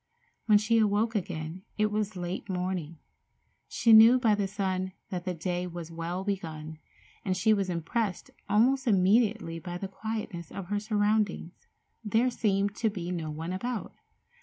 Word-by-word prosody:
When 210 Hz, -2 st, +7 dB
she 220 Hz, +2 st, +2 dB
awoke 215 Hz, +2 st, +2 dB
again 175 Hz, -4 st, -4 dB, 0.2 s
it 215 Hz, 0 st, +2 dB
was 210 Hz, -1 st, -1 dB
late 180 Hz, +2 st, -5 dB
morning. 180 Hz, -3 st, -3 dB, 0.7 s
She 230 Hz, -2 st, +3 dB
knew 225 Hz, +3 st, +9 dB
by 230 Hz, -4 st, +3 dB
the 205 Hz, -1 st, 0 dB
sun 190 Hz, -2 st, -2 dB, 0.2 s
that 180 Hz, -2 st, -4 dB
the 180 Hz, -1 st, -2 dB
day 180 Hz, +2 st, -2 dB
was 170 Hz, -1 st, -7 dB
well 170 Hz, +3 st, -4 dB
begun, 160 Hz, -6 st, -4 dB, 0.4 s
and 185 Hz, -2 st, -1 dB
she 215 Hz, +4 st, +4 dB
was 195 Hz, -3 st, 0 dB
impressed 180 Hz, +4 st, -2 dB, 0.2 s
almost 255 Hz, +6 st, +3 dB
immediately 205 Hz, -3 st, +2 dB
by 175 Hz, +1 st, -6 dB
the 195 Hz, -, -4 dB
quietness 195 Hz, -4 st, -5 dB
of 190 Hz, -2 st, -7 dB
her 205 Hz, 0 st, 0 dB
surroundings. 210 Hz, -4 st, -1 dB, 0.4 s
There 225 Hz, +4 st, +2 dB
seemed 205 Hz, -3 st, 0 dB
to 225 Hz, -, +1 dB
be 180 Hz, -4 st, -5 dB
no 165 Hz, -3 st, -3 dB
one 160 Hz, +4 st, -4 dB
about. 240 Hz, +4 st, -4 dB
195 Hz, 160 wpm, -29 LUFS, 175-215 Hz, 0.7 s, knew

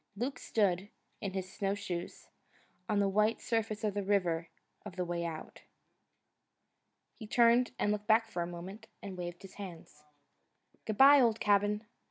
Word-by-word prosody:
Luke 250 Hz, +4 st, -3 dB
stood, 200 Hz, -2 st, 0 dB, 0.3 s
in 195 Hz, -2 st, -3 dB
his 185 Hz, -1 st, -5 dB
snowshoes, 195 Hz, -3 st, -4 dB, 0.6 s
on 210 Hz, -, +1 dB
the 200 Hz, 0 st, +3 dB
white 210 Hz, +3 st, +2 dB
surface 225 Hz, -1 st, -2 dB
of 210 Hz, -2 st, 0 dB
the 205 Hz, -, -1 dB
River 180 Hz, -4 st, 0 dB, 0.3 s
of 210 Hz, -4 st, -9 dB
the 180 Hz, -1 st, -2 dB
Way 170 Hz, 0 st, -2 dB
Out. 165 Hz, -2 st, -7 dB, 1.6 s
He 220 Hz, -, -8 dB
turned 240 Hz, +1 st, +4 dB
to -, -, 0 dB
look 210 Hz, 0 st, -1 dB
back 225 Hz, +1 st, +5 dB
for 175 Hz, -, -2 dB
a 170 Hz, -, -2 dB
moment, 185 Hz, +6 st, -8 dB, 0.2 s
and 195 Hz, -2 st, -6 dB
waved 175 Hz, 0 st, -6 dB
his 195 Hz, -, -11 dB
hand. 180 Hz, -4 st, -8 dB, 1.0 s
"Good 215 Hz, -2 st, -3 dB
bye, 280 Hz, +1 st, +9 dB
old 230 Hz, -3 st, +3 dB
cabin! 205 Hz, +1 st, +2 dB
205 Hz, 160 wpm, -32 LUFS, 180-220 Hz, 1.6 s, bye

